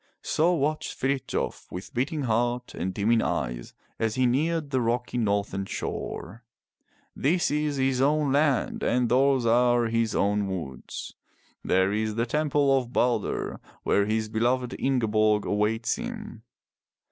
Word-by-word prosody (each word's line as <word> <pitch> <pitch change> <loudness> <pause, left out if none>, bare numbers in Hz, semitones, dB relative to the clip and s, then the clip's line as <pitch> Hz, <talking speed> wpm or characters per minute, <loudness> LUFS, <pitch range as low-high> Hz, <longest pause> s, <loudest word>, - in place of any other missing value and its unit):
So 165 +3 +2
watched 155 0 -1
Frithjof 135 0 -2
with 90 +2 -7
beating 140 +4 -1
heart 120 +1 0
and 90 +3 -3
dimming 110 +4 +2
eyes - - -3 0.2
as 110 -1 0
he 130 - +2
neared 150 +4 0
the 130 -2 +1
rocky 120 +1 -1
northern 100 -3 0
shore. 115 +3 -5 0.7
This 175 +6 +1
is 150 0 0
his 130 -1 +1
own 145 0 +2
land 140 -1 +1
and 125 -1 +1
those 130 0 +3
are 120 +1 +4
his 115 -1 0
own 100 0 +1
woods. 80 -9 -6 0.5
There 95 +2 +2
is 110 0 -1
the 115 +1 +1
temple 145 +1 +2
of 125 -3 -1
Balder 120 -5 0 0.2
where 100 0 +2
his 110 0 0
beloved 120 +3 0
Ingeborg 110 -5 +2
awaits 110 - 0
him. 225 - -7
120 Hz, 135 wpm, -26 LUFS, 110-135 Hz, 0.7 s, are